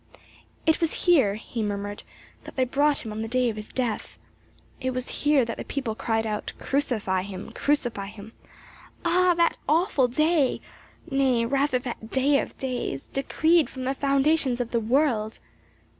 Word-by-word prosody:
"It 320 +1 +3
was 330 - -1
here," 270 - +5
he 225 +1 -5
murmured, 205 -1 -3 0.4
"that - - -10
they 260 - +2
brought 285 +2 +1
him 220 - -5
on 215 +1 -4
the 225 - -3
day 250 +1 +2
of - - -9
his 215 0 -8
death. 245 -4 -3 0.6
It 260 -1 -2
was 255 0 -3
here 290 -4 +4
that 230 - -5
the - - -5
people 265 -6 -3
cried 225 0 -1
out 210 -1 -3
'Crucify 225 -9 0
him 190 0 -7
Crucify 240 -9 -1
him!' 210 +2 -11 0.7
Ah, 355 +1 +4
that 340 -1 +3
awful 310 -4 +3
day 305 +2 +2 0.5
nay 260 -4 +2
rather 275 +1 +1
that 240 -3 -6
day 275 +3 +3
of - - -5
days, 250 - -3
decreed 320 +4 +2
from 260 - -7
the 265 +1 0
foundations 275 -1 +2
of 240 -1 -2
the 235 - +2
world!" 230 -2 +1
255 Hz, 165 wpm, -26 LUFS, 225-285 Hz, 0.7 s, here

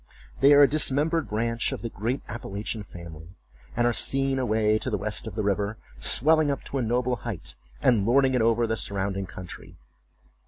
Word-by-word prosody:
They 140 +2 +5
are 145 0 +7
a - - +6
dismembered 155 +2 +1
branch 115 +2 -1
of - - -6
the 115 - -4
great 115 +6 -4
Appalachian 110 -1 -5
family, 85 -2 -12 0.4
and 120 - +2
are 120 - +2
seen 135 +2 +3
away 110 -3 +1
to - - -3
the - - -1
west - - -1
of - - -8
the 110 - -2
river, 100 +1 -2 0.2
swelling 155 +2 +4
up 140 - -3
to 135 - -4
a - - -1
noble 125 +2 -1
height, 110 -5 -7 0.3
and 115 -6 +3
lording 130 +4 +2
it 125 - +1
over 115 +1 +2
the 110 0 -2
surrounding 100 -1 -2
country. 90 -1 -11
115 Hz, 190 wpm, -25 LUFS, 105-135 Hz, 0.4 s, are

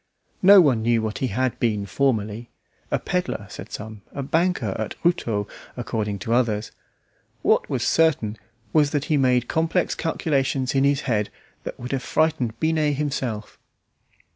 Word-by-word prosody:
No 195 +1 +9
one 130 -9 +3
knew 115 +1 +2
what 110 -1 -3
he 130 - 0
had 125 +3 -1
been 105 -4 0
formerly; 115 -2 -1 0.4
a - - +1
pedlar 180 - -2
said - - -9
some, 110 -1 -7
a 140 - -4
banker 160 - 0
at 110 - -3
Routot 115 - +1 0.3
according 110 -4 -2
to 115 - 0
others. 115 -3 +1 0.7
What - - +3
was - - -1
certain 130 -10 +2 0.3
was 150 -2 +4
that 145 0 -1
he - - +5
made 125 -2 +2
complex 165 +2 +1
calculations 135 -5 0
in 135 0 +3
his 140 -1 +2
head 105 -4 0 0.4
that - - -6
would 125 +1 -6
have 135 -2 -1
frightened 150 -7 0
Binet 155 -2 +1
himself. 130 -7 -3
130 Hz, 155 wpm, -24 LUFS, 110-150 Hz, 0.7 s, No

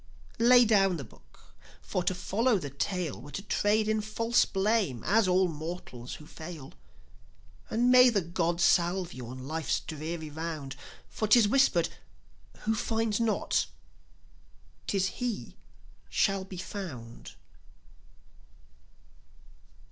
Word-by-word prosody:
Lay 245 +1 +7
down 195 -5 +3
the 140 - -6
book, - - -20 0.3
for 185 - -3
to 185 - +1
follow 220 +6 +1
the 145 -7 -6
tale 140 - -3
Were 145 - -11
to 200 - -4
trade 210 +1 +1
in 215 0 +1
false 230 +2 +1
blame, 195 - 0
as 210 +1 +3
all 185 +1 +3
mortals 155 -6 -7
who 150 - -12
fail. 155 -3 -9 1.0
And 245 +2 +2
may 250 0 +8
the 205 -6 +1
gods 170 0 -1
salve 175 +1 +2
you 125 -2 -8
on 130 +2 -8
life's 160 -1 -1
dreary 155 0 -6
round; 155 -3 -5 0.3
For 215 - -3
'tis 215 0 +6
whispered: 210 -8 +3 0.7
"Who 220 - 0
finds 225 0 -1
not, 230 -2 +1 1.2
'tis 195 -2 +1
he 235 +2 -4 0.5
shall 195 -2 +1
be 190 -1 -9
found!" 170 - -7
185 Hz, 125 wpm, -29 LUFS, 160-215 Hz, 1.2 s, may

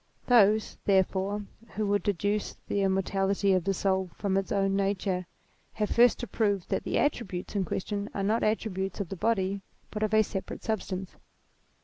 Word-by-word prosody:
Those, 215 -3 +4
therefore, 195 +1 +1 0.3
who 215 +1 0
would 205 0 +2
deduce 205 +2 -1
the 200 - 0
immortality 195 +1 +1
of 185 -2 +1
the 195 - +2
soul 190 -1 0
from 200 -2 -1
its 195 0 -1
own 195 -1 +2
nature 195 -2 0 0.5
have 210 -1 -1
first 240 +1 +5
to 240 - -4
prove 205 -5 0
that - - 0
the - - -1
attributes 210 -10 -1
in 195 -2 +1
question 200 +4 -3
are 195 - -3
not 215 +3 +2
attri 215 -1 0
butes 190 +2 -3
of 195 -5 -3
the - - -4
body 195 -1 0 0.3
but 210 - -4
of 215 -1 +1
a 215 - +6
separate 195 -2 -6
substance. 190 -4 -3
200 Hz, 180 wpm, -29 LUFS, 190-210 Hz, 0.5 s, a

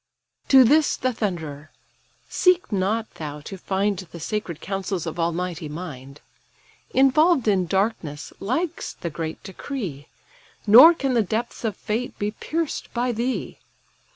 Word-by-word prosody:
To 265 -1 +8
this 295 +5 +3
the 255 0 -1
thunderer: 160 -9 -4 0.6
"Seek 365 -5 +2
not 210 +3 0
thou 150 -2 -6
to 195 - -8
find 195 +1 -1
The 175 -2 -9
sacred 170 -1 -4
counsels 190 0 -3
of 165 +1 -5
almighty 170 -1 -2
mind: 150 -4 -8 0.7
Involved 275 +1 +4
in 190 -4 +2
darkness 190 -6 -2
lies 295 - -2
the 170 - -3
great 160 +1 -5
decree, 190 - -6 0.6
Nor 255 +11 +9
can 270 -4 -1
the 235 - +4
depths 220 +5 -3
of 220 -3 -2
fate 230 +3 -3
be 205 +1 -2
pierced 320 +7 -4
by 245 +1 +1
thee. 240 +3 -3
200 Hz, 135 wpm, -23 LUFS, 170-245 Hz, 0.7 s, Nor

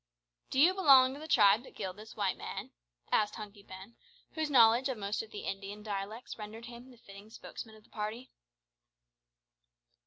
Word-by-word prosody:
"Do 265 - -1
you 340 +6 +6
belong 270 -8 +6
to 280 - -9
the 310 - -8
tribe 210 -6 +5
that 265 - -15
killed 190 -2 -5
this 215 +1 -12
white 200 -3 0
man?" - - -7 0.4
said 210 -1 +3
Hunky 210 -1 -9
Ben, 195 +3 -12 0.3
whose 315 -2 -2
knowledge 240 0 +5
of 260 - -3
most 205 0 -2
of 225 - -10
the 210 - -7
Indian 200 +2 -5
dialects 210 +3 -5
rendered 215 +2 -8
him 240 +2 -11
the 250 - -16
fitting 200 -1 -14
spokesman 220 0 -9
of 215 - -18
the - - -26
party. 220 +4 -5
220 Hz, 180 wpm, -32 LUFS, 205-250 Hz, 0.4 s, you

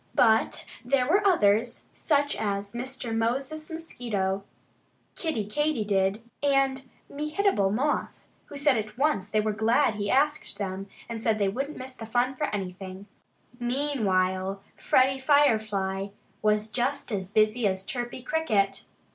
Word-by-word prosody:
But 225 -1 +3 0.2
there 250 0 +2
were 395 +6 +3
others, 225 - +3
such 285 -2 +1
as 200 -1 -2
Mr. 245 -1 -3
Moses 270 +7 -1
Mosquito, 220 - -3 0.7
Kiddie 315 - -2
Katydid, 210 -6 0 0.2
and 270 -2 +1 0.2
Mehitable 300 - +1
Moth, 275 +8 -1 0.2
who 290 - -9
said 280 -3 +3
at 215 0 -4
once 275 -9 +1
that - - -22
they 215 - +4
were 215 0 0
glad 220 +1 +3
he 205 -1 -3
asked 300 +3 +1
them 195 -1 -4 0.2
and 230 -1 -5
that 220 -1 +2
they 200 -2 +2
wouldn't 275 +8 -4
miss 260 0 -7
the 225 -3 -9
fun 245 +3 +1
for 295 - -1
anything. 190 -2 -5 0.5
Meanwhile 195 -8 0
Freddie 265 +1 +3
Firefly 215 -9 +2 0.3
was 215 0 +1
just 255 +2 -1
as 190 -3 -2
busy 215 +2 +3
as 190 0 -2
Chirpy 240 0 -4
Cricket. 205 -12 0
225 Hz, 140 wpm, -27 LUFS, 200-275 Hz, 0.7 s, they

